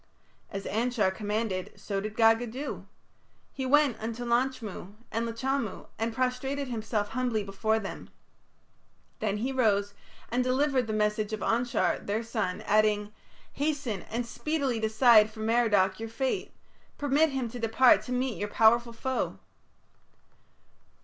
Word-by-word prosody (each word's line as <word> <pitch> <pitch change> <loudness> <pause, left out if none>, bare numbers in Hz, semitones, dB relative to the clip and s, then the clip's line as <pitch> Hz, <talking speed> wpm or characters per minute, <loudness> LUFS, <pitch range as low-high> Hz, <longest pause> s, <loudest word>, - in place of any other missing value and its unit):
As 195 -1 -6
Anshar 225 -2 +1
commanded 210 -2 -2
so 195 -2 -3
did 215 +1 -5
Gaga 225 +1 +4
do. 260 +6 -6 0.7
He 265 -1 -3
went 280 -4 +4
unto 230 +2 -4
Lachmu 235 -5 -1 0.2
and 230 +1 -1
Lachamu 235 -2 -3
and 225 +1 0
prostrated 255 +3 -2
himself 220 -3 -2
humbly 245 -4 -1
before 210 +3 0
them. 200 -3 -6 1.1
Then 210 -1 -1
he 250 +6 -2
rose 205 -6 +1 0.4
and 250 +2 +2
delivered 260 -1 +1
the - - -2
message 210 0 0
of 215 - -3
Anshar, 240 +4 +1
their 215 +3 -2
son, 195 -5 -2
adding: 210 0 +2 0.4
"Hasten 280 - -2
and 235 +2 -2
speedily 275 -1 -2
decide 220 0 +5
for 220 0 -10
Merodach 220 -4 +2
your 225 0 -5
fate. 260 +3 -2 0.5
Permit 290 +3 +3
him 265 -3 -2
to 245 - -7
depart 230 +3 +5
to 250 - -7
meet 250 -1 -1
your 205 - -2
powerful 235 +2 +4
foe." 260 +3 -2
230 Hz, 135 wpm, -28 LUFS, 215-255 Hz, 1.1 s, decide